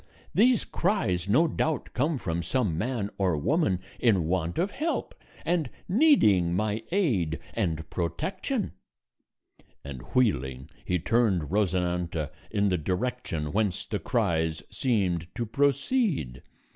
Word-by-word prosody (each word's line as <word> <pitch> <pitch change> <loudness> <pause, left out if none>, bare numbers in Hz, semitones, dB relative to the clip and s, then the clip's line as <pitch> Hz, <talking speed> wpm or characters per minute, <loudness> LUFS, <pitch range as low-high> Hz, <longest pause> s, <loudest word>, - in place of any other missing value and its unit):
These 240 +3 +4
cries 95 - 0
no 155 +11 +5
doubt 155 -2 -1
come 145 +4 +1
from 85 -7 -2
some 100 -1 0
man 110 +2 -2
or 90 -5 +2
woman 100 - +1 0.2
in 100 -9 +3
want 85 0 -1
of 190 +4 +1
help, 320 +8 -2 0.3
and 165 -5 +1 0.2
needing 140 - +4
my 105 +2 0
aid 110 - +1 0.2
and 80 -8 -1
protection;" 185 - -2 1.1
and 70 -3 -7
wheeling, 65 - +1
he 90 - 0
turned 95 - +1
Rosinante 90 -5 0 0.2
in 100 -1 +1
the 90 -2 +1
direction 90 -3 -2
whence 105 -3 0
the - - -3
cries 80 -1 0
seemed 95 -10 0
to 120 - -2
proceed. 140 - +1
100 Hz, 120 wpm, -27 LUFS, 85-135 Hz, 1.1 s, no